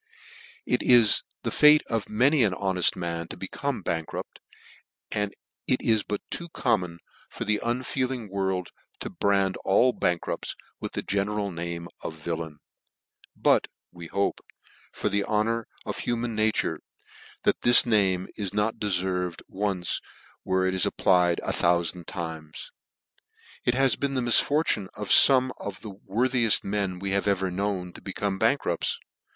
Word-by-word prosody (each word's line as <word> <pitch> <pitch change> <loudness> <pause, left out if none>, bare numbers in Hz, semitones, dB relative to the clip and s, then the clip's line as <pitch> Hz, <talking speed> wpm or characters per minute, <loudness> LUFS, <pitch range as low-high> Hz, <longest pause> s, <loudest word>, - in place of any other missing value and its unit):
It - - +1
is 120 -4 +5 0.2
the - - -2
fate 150 0 +6
of 115 -2 -2
many 130 +7 +3
an 105 -5 +3
honeft 95 -2 +1
man 85 -1 -4
to - - -8
become - - -3
a - - -9
bank 80 -2 -3
rupt, - - -6 0.7
and 105 -1 0 0.4
it 130 - +2
is 110 -2 +2
but 105 0 -4
too 170 0 -4
common 90 - -1 0.3
for - - -6
the 105 0 +1
unfeeling 125 0 -2
world 95 -2 -2 0.3
to - - -5
brand 100 -2 +1
all 125 +6 +3
bankrupts 85 -1 -2 0.2
with - - -5
the - - -3
general 100 0 -1
name 85 0 -5
of 80 - -5
villain: 80 -1 -5 0.8
but, - - +3 0.2
we 85 -2 -10
hope, 100 +4 -1 0.5
for - - -3
the 100 0 +1
honour 110 +2 0 0.2
of - - -4
human 120 -1 -2
nature, 110 0 +1 0.6
that - - +1
this 120 +1 +7
name 95 -5 +2
is 100 -1 -5
not 105 +2 0
deferved 90 -3 -1
once 95 -3 -1 0.4
where 95 0 0
it 95 - +1
is 95 - +2
applied 90 -2 +2
a - - -1
thoufand 85 0 +1
times. 80 -3 -7 0.9
It 125 - +2
has 135 -2 +3
been 140 -1 -2
the 130 - 0
misfortune 120 - +3
of 105 -1 -6
fomeof 130 -1 +4
the 110 - -8
wor 100 +5 -2
thieft 120 -4 +3
men 100 -2 -1
we 100 +1 -3
have 100 +1 0
ever 95 -2 +1
known 95 -1 -2
to - - -12
become 95 0 -3
bank 115 +6 +3
rupts. 85 - -1
100 Hz, 155 wpm, -26 LUFS, 90-115 Hz, 0.9 s, this